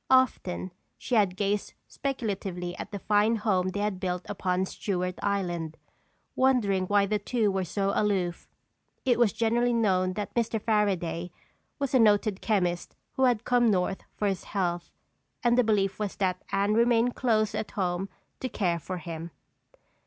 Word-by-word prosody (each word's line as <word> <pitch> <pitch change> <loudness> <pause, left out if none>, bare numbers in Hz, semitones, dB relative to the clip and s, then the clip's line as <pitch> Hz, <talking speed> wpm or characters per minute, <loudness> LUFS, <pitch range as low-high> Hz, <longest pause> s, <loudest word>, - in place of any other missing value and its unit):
Often 225 -8 +2 0.3
she 255 - -6
had 200 -5 +3
gazed 205 +1 -1
speculatively 195 -9 -3
at - - -6
the 205 - -5
fine 210 +3 +2
home 195 -4 +1
they 205 +2 -3
had 205 -3 -1
built 180 -1 -2
upon 185 -2 -1
Stewart 180 -2 -2
Island, 175 -5 -2 0.6
wondering 210 -8 +2
why 205 0 +4
the 210 +1 0
two 215 0 +1
were 190 -1 0
so 195 +2 -1
aloof. 190 -5 0 0.6
It 245 -2 +3
was 235 -4 +4
generally 235 +3 +1
known 185 -5 +2
that 205 0 -4
Mr. 230 -1 0
Fairaday 185 -6 0 0.5
was 275 -2 -2
a 260 - +5
noted 210 -2 +3
chemist 180 -5 0 0.2
who 265 - +2
had 240 -3 +2
come 245 -2 +4
North 190 -1 0
for 210 - 0
his 195 -2 -2
health 175 -3 -2 0.5
and 240 -1 +4
the 250 - +5
belief 200 -3 +1
was 210 -2 -2
that 185 -2 -1
Anne 200 +1 +2
remained 235 +1 +3
close 215 -4 +1
at - - -3
home 185 0 -2 0.3
to 255 - -3
care 175 -7 0
for 185 +3 -5
him. 165 -1 -6
200 Hz, 160 wpm, -28 LUFS, 185-225 Hz, 0.6 s, a